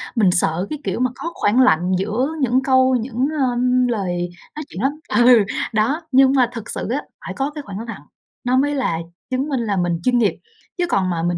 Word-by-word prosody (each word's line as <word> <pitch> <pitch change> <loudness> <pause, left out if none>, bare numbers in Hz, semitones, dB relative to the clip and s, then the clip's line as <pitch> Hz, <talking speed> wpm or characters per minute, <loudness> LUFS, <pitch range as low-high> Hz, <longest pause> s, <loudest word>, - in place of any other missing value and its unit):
mình 200 -5 +4
sợ, 175 +1 +1
cái 300 - -4
kiểu - - -2
mà, 255 0 +2
có 335 - -5
khoảng 225 +5 +2
lặng 180 -6 +3
giữa 215 +7 -1
những 255 0 +2
câu 260 -1 +4
những, 245 +2 -1 0.2
ơm, 250 +1 +2
lời 180 -6 -2 0.3
nói 305 - -5
chuyện 190 - -7
lắm. 270 - +2 0.3
Ừ, 240 -4 +7 0.3
đó, 235 +10 +1
nhưng 265 0 +5
mà 250 -3 +3
thực 225 -3 -7
sự - - -4
á, 270 +5 -1 0.2
phải 190 - -5
có 275 +2 -2
cái 300 - -4
khoảng 200 0 -7
lặng, 215 -10 -7 0.4
nó 250 +1 +2
mới 290 +2 +1
là 250 -12 0 0.3
chứng 260 +3 -1
minh 270 -4 -1
là 210 -4 -1
mình 175 -2 0
chuyên 250 -1 +2
nghiệp, 220 -4 +2 0.4
chứ 355 - +1
còn 190 - +1
mà 165 -1 -2
mình 175 0 0
240 Hz, 220 wpm, -20 LUFS, 195-260 Hz, 0.4 s, Ừ